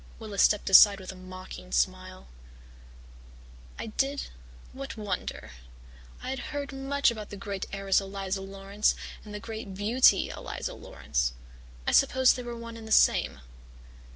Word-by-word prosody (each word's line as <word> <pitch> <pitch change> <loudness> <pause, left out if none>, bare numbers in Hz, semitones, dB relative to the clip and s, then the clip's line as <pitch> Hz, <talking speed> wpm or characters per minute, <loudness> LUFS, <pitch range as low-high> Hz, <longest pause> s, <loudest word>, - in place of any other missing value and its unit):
"Willis 210 -3 -2
stepped 210 - +3
aside 200 +1 +8
with 185 0 -7
a - - -12
mocking 185 - -10
smile. 60 +1 -1 1.5
"'I - - -5
did 270 +6 -2 0.4
what 270 -2 -7
wonder? 205 - -4 0.7
I - - -3
had 265 - -3
heard 285 -2 -4
much 270 0 +1
about 215 -3 -7
the 205 - -8
great 200 -2 -5
heiress, 195 0 +1
Eliza 195 0 -4
Laurance, 195 +2 0 0.3
and 210 - -11
the 210 - -5
great 220 -3 -7
beauty, 220 +6 +4
Eliza - - -5
Laurance. - - -2 0.5
I - - +1
supposed 260 -1 +5
they 255 - -5
were 240 -1 -6
one 230 0 -8
and 225 -1 -10
the - - -9
same. - - +4
210 Hz, 150 wpm, -28 LUFS, 195-240 Hz, 1.5 s, aside